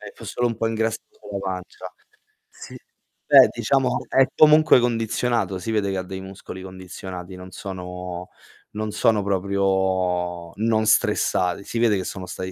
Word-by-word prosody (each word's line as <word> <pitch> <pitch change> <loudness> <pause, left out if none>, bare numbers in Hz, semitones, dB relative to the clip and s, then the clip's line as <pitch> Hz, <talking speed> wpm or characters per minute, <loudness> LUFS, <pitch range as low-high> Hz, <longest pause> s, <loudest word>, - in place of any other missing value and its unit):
È - - -9
f - - -14
solo 120 - -1
un 115 - -3
po' 115 - 0
ingrassato 110 0 -1 0.2
sulla 105 -2 -6
pancia. 95 -2 -6 0.6
Sì, - - -12 0.5
beh, - - +8
diciamo 135 -2 0
è 135 - +5
comunque 155 -3 +6
condizionato, 115 -4 0
si 110 +5 -4
vede 100 -3 0
che 95 - -2
ha 95 - -2
dei 95 +1 -7
muscoli 95 -1 -9
condizionati, 95 0 -8
non 90 0 -11
sono 90 -1 -7 0.4
non 110 0 -4
sono 110 0 +2
proprio 95 -3 0
non 110 0 +1
stressati, 90 -3 +2
si 115 - -5
vede 115 -3 +3
che 95 - -3
sono 95 0 -6
stati 95 0 -6
95 Hz, 160 wpm, -23 LUFS, 90-110 Hz, 0.6 s, beh